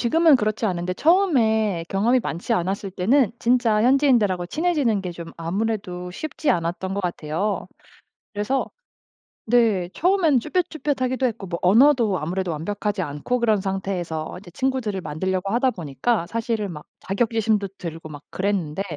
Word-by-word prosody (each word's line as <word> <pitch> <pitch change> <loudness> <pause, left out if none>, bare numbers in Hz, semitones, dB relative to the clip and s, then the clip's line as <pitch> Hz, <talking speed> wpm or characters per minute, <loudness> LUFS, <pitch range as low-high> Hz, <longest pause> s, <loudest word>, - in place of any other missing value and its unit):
지금은 320 +5 +5
그렇지 215 -1 -1
않은데 180 -2 -1
처음에 220 - +2
경험이 230 +6 +2
많지 175 +2 -3
않았을 195 +1 -2
때는 215 +6 +2
진짜 235 -3 +2
현지인들하고 240 -9 +3
친해지는 295 - 0
게 180 - -4
좀 170 0 -8
아무래도 180 0 -3
쉽지 310 - -2
않았던 175 +3 -1
것 200 - -1
같아요. 175 +2 -2 0.7
그래서 210 +6 -1 0.8
네 220 -6 +2
처음에는 345 -6 +3
쭈뼛쭈뼛하기도 285 -4 -1
했고 220 -5 -3
뭐 170 -1 -4
언어도 225 - +4
아무래도 180 +3 -2
완벽하지 205 +5 -2
않고 150 +11 -2
그런 220 -3 +2
상태에서 185 -5 -3
이제 180 -2 -14
친구들을 255 -6 -1
만들려고 185 +5 -2
하다 255 +2 +3
보니까 175 - -1
사실은 225 -1 -2
막 150 -3 -9 0.2
자격지심도 215 0 0
들고 165 -2 -7
막 145 -1 -10
그랬는데 190 -3 -1
205 Hz, 370 characters per minute, -23 LUFS, 180-245 Hz, 0.8 s, 지금은